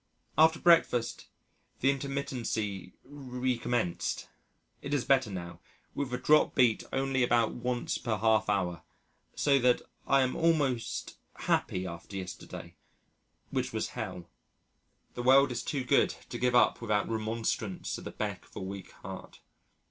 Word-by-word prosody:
After 160 +1 +6
breakfast 160 -9 +3 0.5
the 135 +2 +4
intermittency 120 -9 -3
recommenced 125 -7 -2 0.5
it 145 - -2
is 135 - -1
better 130 -4 +3
now, 90 -3 -6 0.3
with 140 -3 -3
a 125 - -1
dropped 150 +4 +4
beat 120 -4 +4
only 135 0 0
about 120 -2 +3
once 125 0 -2
per 110 -3 -1
half 110 0 +3
hour, 90 -4 0 0.5
so 140 -2 +3
that 125 -1 +3 0.2
I 135 -1 +5
am 130 - -1
almost 130 - 0 0.2
happy 90 0 0
after 85 +3 -8
yesterday, 90 -2 -7 0.8
which - - -1
was - - -1
Hell. 90 -1 -6 0.9
The 120 - -4
world 135 +2 +6
is 120 - -2
too 140 -3 -2
good 125 - +3
to - - -5
give 125 0 +2
up 110 -1 +4
without 105 -3 +1
remonstrance 110 -2 -2
at - - -11
the - - -5
beck - - -4
of - - -23
a - - -4
weak 95 0 -7
heart. - - -8
120 Hz, 140 wpm, -30 LUFS, 105-135 Hz, 0.9 s, After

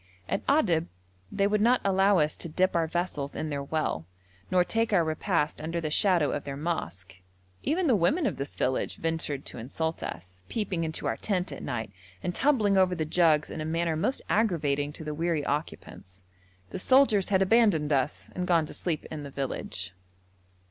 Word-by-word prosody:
At - - -1
Adab 180 - +3 0.4
they 200 - +1
would 210 +1 +2
not 245 +3 +4
allow 195 0 +4
us 150 -2 +2
to 170 - -6
dip 185 +4 +1
our 165 -1 +2
vessels 160 -4 -3
in 155 - -3
their 140 -1 -2
well, 140 - -2 0.4
nor 180 -1 +4
take 225 +4 0
our 185 -5 +4
repast 160 -1 -1
under 165 +2 -2
the 155 -2 -3
shadow 175 -3 +3
of 145 - -3
their 140 -1 -5
mosque: 95 - -4 0.4
even 345 +5 0
the 260 -7 +4
women 285 - +2
of - - -1
this 140 +1 -5
village 130 0 -1
ventured 160 -4 -2
to - - -7
insult 160 +7 -3
us, 90 +1 -7
peeping 200 -6 -2
into 160 0 -3
our - - 0
tent 185 -3 -1
at - - -7
night, 115 -6 -4 0.3
and 180 - -1
tumbling 220 -8 +3
over 185 -1 +3
the 160 -2 -1
jugs 155 -2 +3
in 160 - -5
a - - -2
manner 165 +1 0
most 250 +12 -1
aggravating 150 -9 +1
to 160 - -8
the 150 -1 -4
weary 160 -1 -1
occupants. 95 - -5 0.5
The - - -4
soldiers 235 -4 +4
had 195 -1 +4
abandoned 190 -8 +3
us 135 +1 -1
and 180 0 -3
gone 165 -3 +3
to - - -8
sleep 165 -4 -3
in 155 -1 -5
the 140 - -7
village. 95 -10 -4
165 Hz, 190 wpm, -28 LUFS, 145-195 Hz, 0.5 s, not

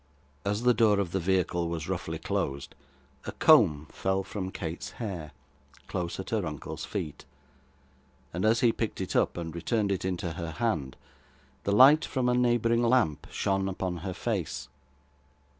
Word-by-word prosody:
As 105 +3 -1
the 125 0 +5
door 105 -3 +4
of 95 -4 -1
the 95 - 0
vehicle 90 -1 0
was 80 -2 -4
roughly - - -3
closed, 70 0 -3 0.5
a - - -2
comb 75 0 +5
fell 95 0 -1
from 95 -1 -5
Kate's 85 -2 -5
hair, 90 -9 -5 0.6
close 85 0 -4
at 95 - -6
her 110 -3 +1
uncle's 75 -4 -5
feet; 75 -2 -5 1.1
and 90 - -2
as 110 +2 +3
he 120 -3 +5
picked 115 -1 -3
it 95 - -3
up, - - +2
and 85 -2 -4
returned 100 +4 0
it 95 - -1
into 90 -2 -2
her 85 -2 -5
hand, 80 - -1 0.7
the 100 - +1
light 135 +9 +7
from 125 -2 0
a - - +3
neighbouring 120 -1 +2
lamp 120 - +2
shone 95 -1 0
upon 95 -1 -3
her 90 +2 -5
face. 65 0 -3
95 Hz, 160 wpm, -28 LUFS, 85-115 Hz, 1.1 s, light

